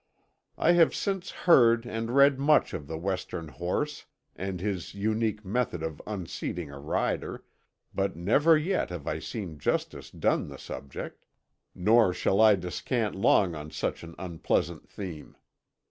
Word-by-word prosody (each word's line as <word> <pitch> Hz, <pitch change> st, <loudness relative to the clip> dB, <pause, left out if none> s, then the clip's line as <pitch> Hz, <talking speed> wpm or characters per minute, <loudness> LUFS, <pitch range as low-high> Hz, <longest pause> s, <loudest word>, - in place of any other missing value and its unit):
I 170 Hz, -, +4 dB
have 175 Hz, -1 st, +5 dB
since 195 Hz, -2 st, -2 dB
heard 120 Hz, -8 st, +4 dB
and 115 Hz, -1 st, -3 dB
read 140 Hz, -1 st, +6 dB
much 150 Hz, +2 st, +3 dB
of 70 Hz, -, -5 dB
the 80 Hz, -, -4 dB
Western 90 Hz, -2 st, -3 dB
horse 115 Hz, -, -3 dB, 0.3 s
and 95 Hz, -1 st, -4 dB
his 95 Hz, -1 st, -3 dB
unique 110 Hz, +1 st, -1 dB
method 100 Hz, -5 st, -1 dB
of 80 Hz, -2 st, -5 dB
unseating 90 Hz, -5 st, -4 dB
a 70 Hz, -, -9 dB
rider, 75 Hz, +2 st, -2 dB, 0.5 s
but 100 Hz, 0 st, -1 dB
never 140 Hz, -, +4 dB
yet 180 Hz, +5 st, 0 dB
have 85 Hz, -5 st, -6 dB
I -, -, -2 dB
seen 90 Hz, -9 st, -6 dB
justice -, -, -2 dB
done -, -, 0 dB
the -, -, -9 dB
subject. 70 Hz, -1 st, -8 dB, 0.5 s
Nor 105 Hz, 0 st, +4 dB
shall 100 Hz, +3 st, +2 dB
I 110 Hz, -2 st, +7 dB
descant 105 Hz, +5 st, -2 dB
long 95 Hz, -3 st, +3 dB
on 75 Hz, -1 st, -7 dB
such -, -, -3 dB
an 85 Hz, 0 st, -10 dB
unpleasant 85 Hz, -2 st, -2 dB
theme. 90 Hz, -7 st, -8 dB
100 Hz, 145 wpm, -28 LUFS, 85-120 Hz, 0.5 s, I